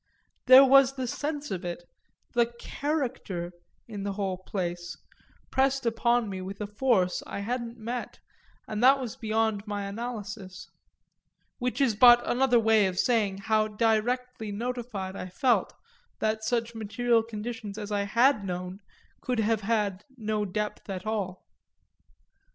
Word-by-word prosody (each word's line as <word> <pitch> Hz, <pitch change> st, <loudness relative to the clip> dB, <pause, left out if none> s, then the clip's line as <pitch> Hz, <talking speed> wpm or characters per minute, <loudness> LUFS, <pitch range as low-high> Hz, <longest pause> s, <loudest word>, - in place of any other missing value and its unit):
That 260 Hz, +1 st, +11 dB
was 270 Hz, 0 st, +6 dB
the 260 Hz, -1 st, -3 dB
sense 295 Hz, +4 st, -4 dB
of 185 Hz, -2 st, -3 dB
it 175 Hz, 0 st, -5 dB, 0.5 s
the 235 Hz, -1 st, +3 dB
character, 260 Hz, -, -3 dB, 0.4 s
in 210 Hz, -3 st, -6 dB
the 200 Hz, 0 st, -3 dB
whole 190 Hz, -2 st, -2 dB
place, 175 Hz, -2 st, -4 dB, 0.5 s
pressed 270 Hz, 0 st, +1 dB
upon 235 Hz, 0 st, +2 dB
me 190 Hz, -2 st, -5 dB
with 195 Hz, +2 st, -7 dB
a 210 Hz, -, -2 dB
force 205 Hz, -3 st, +1 dB
I 200 Hz, -, -5 dB
hadn't 235 Hz, +2 st, -3 dB
met 235 Hz, +2 st, -5 dB, 0.5 s
and 215 Hz, 0 st, -3 dB
that 270 Hz, +2 st, +7 dB
was 250 Hz, -2 st, -5 dB
beyond 220 Hz, -3 st, -1 dB
my 205 Hz, -1 st, -3 dB
analysis 210 Hz, -3 st, -6 dB, 0.9 s
which 250 Hz, +2 st, -2 dB
is 265 Hz, -5 st, +3 dB
but 240 Hz, +2 st, +7 dB
another 250 Hz, -1 st, +3 dB
way 220 Hz, -3 st, +4 dB
of 185 Hz, -1 st, -4 dB
saying 205 Hz, -4 st, +1 dB
how 215 Hz, -1 st, +2 dB
directly 225 Hz, +1 st, 0 dB
notified 225 Hz, -4 st, -4 dB
I 185 Hz, -, -6 dB
felt 245 Hz, +7 st, +1 dB, 0.5 s
that 220 Hz, 0 st, -1 dB
such 235 Hz, 0 st, -1 dB
material 230 Hz, +2 st, +1 dB
conditions 220 Hz, -1 st, -6 dB
as 210 Hz, -1 st, -6 dB
I 205 Hz, -1 st, +1 dB
had 235 Hz, +2 st, +3 dB
known 180 Hz, 0 st, -5 dB, 0.4 s
could 250 Hz, -1 st, -2 dB
have 220 Hz, 0 st, +1 dB
had 205 Hz, -2 st, 0 dB
no 215 Hz, -2 st, -1 dB
depth 210 Hz, +2 st, -4 dB
at 190 Hz, +1 st, -5 dB
all. 200 Hz, -4 st, -3 dB
220 Hz, 145 wpm, -28 LUFS, 200-245 Hz, 0.9 s, That